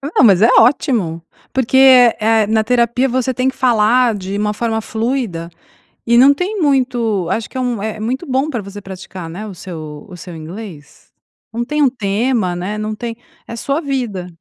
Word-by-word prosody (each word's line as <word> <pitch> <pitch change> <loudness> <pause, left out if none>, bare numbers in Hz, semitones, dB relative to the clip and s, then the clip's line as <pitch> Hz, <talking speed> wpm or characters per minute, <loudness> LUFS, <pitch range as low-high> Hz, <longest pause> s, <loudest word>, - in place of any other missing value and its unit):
Não, - - +5
mas 195 -4 +5
é 225 - +6
ótimo! 225 - +1 0.3
Porque, 260 0 +1
eh 255 -3 +7 0.3
eh, - - -3
na 220 0 +2
terapia 245 +2 +1
você 255 +1 0
tem 255 +2 0
que 265 - -7
falar 240 -1 +3
de 195 0 -5
uma 210 0 -1
forma 225 0 -2
fluida 220 -7 -3 0.6
e 235 0 +3
não 270 +3 +7
tem 380 +8 -3
muito 245 - +1
acho 215 +3 -2
que - - -8
é - - -1
um 245 -4 -2
é 215 0 -4
muito 255 +9 -3
bom 270 +2 0
pra 240 -6 -3
você 200 +1 -9
praticar, 190 -2 -9
né, 190 +6 -7
o 205 - -8
seu 155 -5 -9
o 180 - -10
seu 175 0 -10
inglês. 160 -2 -10 0.4
Não 235 +1 -2
tem 300 +3 -1
um 280 - +5
tema, 215 -3 -1
né, 185 +4 -4
não 215 0 -3
tem 230 +1 -5 0.3
é 230 - -6
sua 275 +6 -2
vida. 245 - -3
225 Hz, 195 wpm, -17 LUFS, 195-255 Hz, 0.6 s, eh